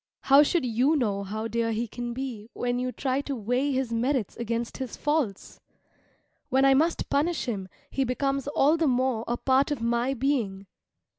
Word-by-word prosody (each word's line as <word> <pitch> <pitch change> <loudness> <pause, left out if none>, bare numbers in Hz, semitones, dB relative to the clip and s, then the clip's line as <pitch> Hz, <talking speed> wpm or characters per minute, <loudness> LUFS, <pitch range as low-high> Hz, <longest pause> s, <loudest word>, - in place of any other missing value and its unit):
How 275 +1 +6
should 300 0 +2
you 250 +6 +2
know 210 -8 0
how 215 +3 -4
dear 230 0 -1
he 230 +2 -2
can 240 +2 -5
be 235 -4 -5
when 245 0 -1
you 255 0 -2
try 265 +1 -1
to 280 -1 -4
weigh 250 +5 0
his 260 -3 -1
merits 240 -1 0
against 235 0 -3
his 260 -3 -5
faults? 295 -10 -1 0.9
When 265 0 +3
I 270 - +6
must 320 +5 +1
punish 315 +4 +1
him 195 -6 -4 0.2
he 270 - 0
becomes 275 +2 -1
all 290 +2 +3
the 325 -1 +2
more 255 -3 +1
a 240 - -1
part 265 +3 +2
of 290 -4 -2
my 235 +3 0
being. 230 -7 -1
255 Hz, 180 wpm, -27 LUFS, 230-275 Hz, 0.9 s, How